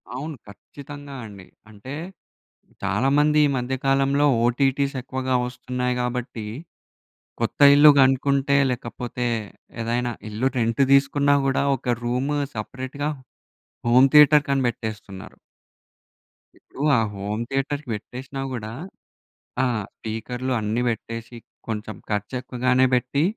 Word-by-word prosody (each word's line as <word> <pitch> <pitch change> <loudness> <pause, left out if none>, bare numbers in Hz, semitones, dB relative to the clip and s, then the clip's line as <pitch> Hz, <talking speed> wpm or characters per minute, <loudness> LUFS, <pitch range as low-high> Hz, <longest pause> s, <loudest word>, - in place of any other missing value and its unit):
అవును. 150 +3 -5
ఖచ్చితంగా 140 +7 -11
అండి. 100 -4 -12 0.2
అంటే 110 +6 -10 0.9
చాలామంది 135 +9 +2
ఈ - - -1
మధ్య 125 +2 -2
కాలంలో, 135 +1 +3 0.2
ఓటీటీస్ 135 +2 +1
ఎక్కువగా 130 0 -2
వస్తున్నాయి 125 0 -3
గాబట్టి 125 -3 -4 1.0
కొత్త - - -2
ఇల్లు 150 +1 +8
కనుక్కుంటే, 135 +1 +3
లేకపోతే 120 0 -4 0.6
ఏదైనా 120 +1 -1 0.2
ఇల్లు 115 +5 0
రెంట్ 115 +3 +1
తీసుకున్నా 140 +1 +4
గూడా, 135 +1 +1
ఒక 120 -3 -1
రూమ్ 125 +4 -1 0.2
సెపరేట్‌గా 130 +6 -4 0.8
హోమ్ 130 +3 +6
థియేటర్‌కని 145 -2 +6
పెట్టేస్తున్నారు. 105 -4 -6 1.2
ఇప్పుడు 135 - -12 0.2
ఆ - - +4
హోమ్ 105 +3 -4
థియేటర్‌కి 140 +1 -2
పెట్టేసినా 130 +5 -7
గూడా 110 -3 -5 0.9
ఆ! - - +3 0.3
స్పీకర్‌లు 125 +4 -5
అన్నీ 110 +3 -1
పెట్టేసి, 115 +1 -6 0.3
కొంచెం 110 -1 -4
ఖర్చు 105 +3 -2
ఎక్కువగానే 125 +1 +1
పెట్టి, 125 +4 +1
125 Hz, 105 wpm, -23 LUFS, 115-140 Hz, 1.2 s, ఇల్లు